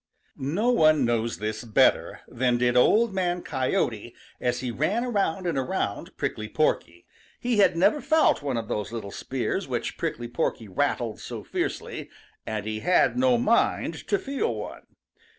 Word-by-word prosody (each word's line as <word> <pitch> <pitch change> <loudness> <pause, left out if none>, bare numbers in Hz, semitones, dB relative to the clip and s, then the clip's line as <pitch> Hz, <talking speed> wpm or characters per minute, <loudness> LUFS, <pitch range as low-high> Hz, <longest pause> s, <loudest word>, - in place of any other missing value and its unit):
|NO 175 - 0
one 155 - +4
knows 115 -1 0
this 110 +1 -4
better 110 -3 +2
than 125 0 +1
did 120 0 +2
Old 210 - +4
Man 180 -2 -1
Coyote 120 -4 -1 0.2
as 125 -1 -1
he 125 -2 -2
ran 200 - 0
around 195 -6 0
and 170 -6 0
around 130 - -3
Prickly 110 0 -3
Porky. 85 - -1 0.3
He 245 -2 0
had 185 -4 +4
never 285 - +3
felt 315 - +3
one 140 -4 -2
of 115 -1 -3
those 105 +1 -3
little 110 -4 -5
spears - - -3
which - - -3
Prickly 120 0 -3
Porky 115 -1 -2
rattled 115 +1 -1
so - - -7
fiercely, - - -4 0.4
and 105 -1 -3
he 110 0 -3
had 180 +9 +3
no 255 -1 +3
mind 235 0 +1
to 400 - +2
feel 275 - -2
one. 105 - -8
130 Hz, 160 wpm, -26 LUFS, -, 0.4 s, one